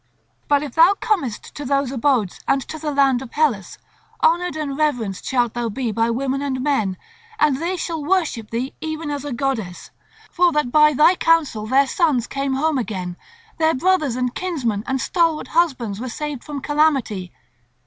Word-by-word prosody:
But 290 Hz, 0 st, +3 dB
if 295 Hz, -, -6 dB
thou 335 Hz, +5 st, +6 dB
comest 310 Hz, -, -2 dB
to 290 Hz, -, -7 dB
those 275 Hz, -1 st, 0 dB
abodes 250 Hz, -6 st, 0 dB
and 275 Hz, -, +3 dB
to 315 Hz, -, -6 dB
the 305 Hz, 0 st, -3 dB
land 275 Hz, -3 st, +2 dB
of 265 Hz, -, -9 dB
Hellas, 250 Hz, -, 0 dB, 0.5 s
honoured 350 Hz, +1 st, +2 dB
and 295 Hz, -3 st, -3 dB
reverenced 245 Hz, -11 st, -1 dB
shalt 245 Hz, -3 st, +1 dB
thou 240 Hz, -1 st, -2 dB
be 235 Hz, +1 st, -2 dB
by 230 Hz, +2 st, +1 dB
women 265 Hz, +3 st, -1 dB
and 270 Hz, -2 st, -2 dB
men; 235 Hz, -9 st, 0 dB, 0.4 s
and 300 Hz, -9 st, +3 dB
they 350 Hz, +3 st, -1 dB
shall 325 Hz, -3 st, -3 dB
worship 300 Hz, -, 0 dB
thee 245 Hz, +4 st, -3 dB
even 315 Hz, -1 st, -4 dB
as 285 Hz, -1 st, -4 dB
a 290 Hz, -, -4 dB
goddess, 235 Hz, -8 st, -3 dB, 0.4 s
for 355 Hz, 0 st, +3 dB
that 300 Hz, -5 st, 0 dB
by 300 Hz, +1 st, +6 dB
thy 305 Hz, +6 st, +6 dB
counsel 320 Hz, -12 st, +1 dB
their 270 Hz, +4 st, +4 dB
sons 275 Hz, -4 st, +1 dB
came 275 Hz, 0 st, -2 dB
home 300 Hz, 0 st, +1 dB
again, 185 Hz, -6 st, -4 dB, 0.4 s
their 320 Hz, 0 st, +3 dB
brothers 315 Hz, -4 st, +1 dB
and 250 Hz, -1 st, -1 dB
kinsmen 255 Hz, -, -2 dB
and 265 Hz, -1 st, 0 dB
stalwart 330 Hz, +1 st, 0 dB
husbands 260 Hz, -, 0 dB
were 255 Hz, +2 st, -4 dB
saved 295 Hz, +1 st, -5 dB
from 290 Hz, -2 st, -6 dB
calamity. 270 Hz, -, +1 dB
275 Hz, 180 wpm, -21 LUFS, 240-310 Hz, 0.5 s, thou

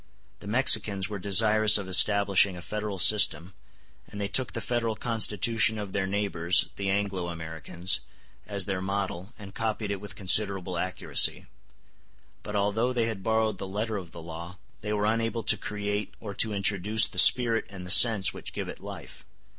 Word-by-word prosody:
The -, -, -13 dB
Mexicans 105 Hz, -4 st, +2 dB
were 105 Hz, -1 st, -6 dB
desirous 105 Hz, +2 st, +4 dB
of 100 Hz, -2 st, -7 dB
establishing 100 Hz, 0 st, +3 dB
a 85 Hz, -, -11 dB
federal 105 Hz, 0 st, -6 dB
system, 95 Hz, -3 st, +3 dB, 0.5 s
and 105 Hz, -, -11 dB
they 100 Hz, -, -3 dB
took 125 Hz, +5 st, +1 dB
the -, -, -4 dB
Federal 115 Hz, -1 st, -3 dB
Constitution 110 Hz, -1 st, +1 dB
of 105 Hz, -2 st, -7 dB
their 95 Hz, -2 st, -2 dB
neighbors, 95 Hz, -3 st, 0 dB
the 100 Hz, -1 st, -4 dB
Anglo 95 Hz, -2 st, -3 dB
Americans, 80 Hz, +2 st, -2 dB, 0.5 s
as 100 Hz, -2 st, -3 dB
their 95 Hz, -2 st, -4 dB
model, 95 Hz, 0 st, -5 dB
and 100 Hz, -2 st, -12 dB
copied 110 Hz, -1 st, -4 dB
it 100 Hz, -1 st, -5 dB
with 105 Hz, -2 st, -9 dB
considerable 95 Hz, -1 st, +3 dB
accuracy. 95 Hz, 0 st, 0 dB
*s -, -, -22 dB, 1.0 s
But 105 Hz, -, -8 dB
although 105 Hz, +5 st, -1 dB
they 120 Hz, -2 st, -1 dB
had 110 Hz, -4 st, -5 dB
borrowed 110 Hz, -1 st, -1 dB
the 95 Hz, -, -6 dB
letter 105 Hz, +3 st, -4 dB
of 90 Hz, -4 st, -9 dB
the 85 Hz, -, -12 dB
law, 85 Hz, +2 st, -10 dB, 0.2 s
they 105 Hz, -, -6 dB
were 105 Hz, 0 st, -2 dB
unable 115 Hz, +1 st, -2 dB
to 110 Hz, -, +2 dB
create 105 Hz, -1 st, -5 dB
or 105 Hz, -3 st, -8 dB
to 110 Hz, +2 st, -1 dB
introduce 105 Hz, +2 st, +2 dB
the -, -, +1 dB
spirit 115 Hz, -3 st, +5 dB
and 95 Hz, -2 st, -11 dB
the 90 Hz, -, -3 dB
sense 100 Hz, -4 st, +6 dB
which -, -, -10 dB
give -, -, -6 dB
it -, -, -9 dB
life. -, -, -12 dB
100 Hz, 180 wpm, -26 LUFS, 95-110 Hz, 1.0 s, sense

